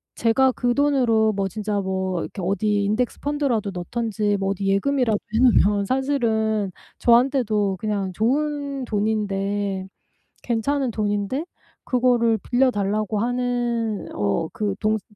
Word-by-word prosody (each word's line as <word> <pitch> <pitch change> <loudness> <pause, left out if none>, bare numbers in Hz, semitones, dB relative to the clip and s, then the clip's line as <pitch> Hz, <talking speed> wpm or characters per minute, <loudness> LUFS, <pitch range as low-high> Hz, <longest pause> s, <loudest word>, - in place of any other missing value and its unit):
제가 260 +3 +3
그 245 -1 0
돈으로 245 -6 +3
뭐 195 -1 -1
진짜 210 +1 -2
뭐 190 -2 -2
이렇게 195 - -6
어디 205 +3 0
인덱스 215 +4 -1
펀드라도 275 -8 -1
넣든지 205 +2 -1
뭐 195 0 -1
어디 195 0 -2
예금이라도 225 +3 +2 0.2
해 - - +3
놓으면 210 -5 +4
사실은 220 -6 0 0.3
저한테도 235 -5 +2
그냥 200 -2 -2
좋은 280 +5 -1
돈인데 205 -3 -1 0.6
괜찮은 255 +3 0
돈인데 205 +6 -1 0.4
그거를 240 -3 +2
빌려 255 +3 +2
달라고 210 0 -1
하는 240 -2 -1
어 105 +8 0
그 205 -2 -2
동생 215 0 +1
220 Hz, 280 characters per minute, -23 LUFS, 200-245 Hz, 0.6 s, 놓으면